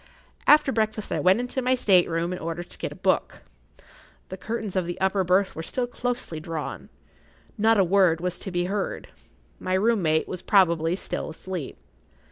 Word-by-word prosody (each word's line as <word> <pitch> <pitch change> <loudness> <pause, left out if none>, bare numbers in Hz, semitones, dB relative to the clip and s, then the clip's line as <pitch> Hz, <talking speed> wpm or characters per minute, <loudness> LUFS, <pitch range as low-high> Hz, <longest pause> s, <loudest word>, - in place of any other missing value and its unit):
After 300 -2 +6
breakfast 215 -2 -1
I - - 0
went 185 +6 +4
into 250 +1 -3
my 255 +1 +2
state 190 -8 +4
room 170 +2 -1
in 180 - -5
order 165 +1 -4
to - - -12
get - - -3
a - - -9
book. - - -1 0.9
The 190 - -5
curtains 220 -1 -4
of 185 -2 0
the 175 - -5
upper 190 0 +1
berth 185 +2 +2
were 160 - -4
still 245 +9 -2
closely 245 -8 -4
drawn. 155 -1 -6 0.7
Not 225 +1 +3
a 195 - +5
word 180 -2 +3
was 180 0 -3
to - - -5
be 175 -1 -1
heard. 195 +2 -3 0.5
My 185 - -1
room 220 +2 +2
mate 155 -1 +1
was 185 - -6
probably 170 -4 +3
still - - -4
asleep. 170 -1 -6
185 Hz, 185 wpm, -25 LUFS, 170-215 Hz, 0.9 s, After